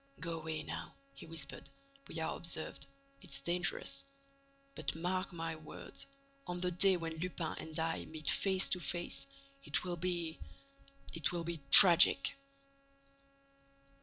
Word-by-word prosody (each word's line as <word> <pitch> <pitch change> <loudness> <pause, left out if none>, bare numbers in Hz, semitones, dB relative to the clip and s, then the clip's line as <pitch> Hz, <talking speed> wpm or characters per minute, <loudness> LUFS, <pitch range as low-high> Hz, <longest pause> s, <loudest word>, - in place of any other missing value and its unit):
"Go 165 -2 -4
away, 160 -1 -4
now," - - -7 0.2
he 140 - -12
whispered, 160 -3 -5 0.4
"we - - -7
are 160 - -2
observed. 160 -4 -2 0.3
It's - - -3
dangerous. 175 - -1 0.7
But - - -4
mark 185 +3 -2
my 165 -1 -4
words: 155 -1 -9 0.4
on 180 0 -4
the 180 0 -1
day 190 +1 +4
when 165 -1 -5
Lupin 170 -1 -3
and 160 -1 -6
I 165 0 -2
meet 155 -1 -8
face 190 -1 +1
to 180 - 0
face, 175 - -3 0.4
it - - -2
will 175 -1 -4
be—it 175 - -5
will 175 -1 -3
be 170 -1 -4
tragic." 180 - +9
170 Hz, 135 wpm, -34 LUFS, 160-180 Hz, 0.7 s, tragic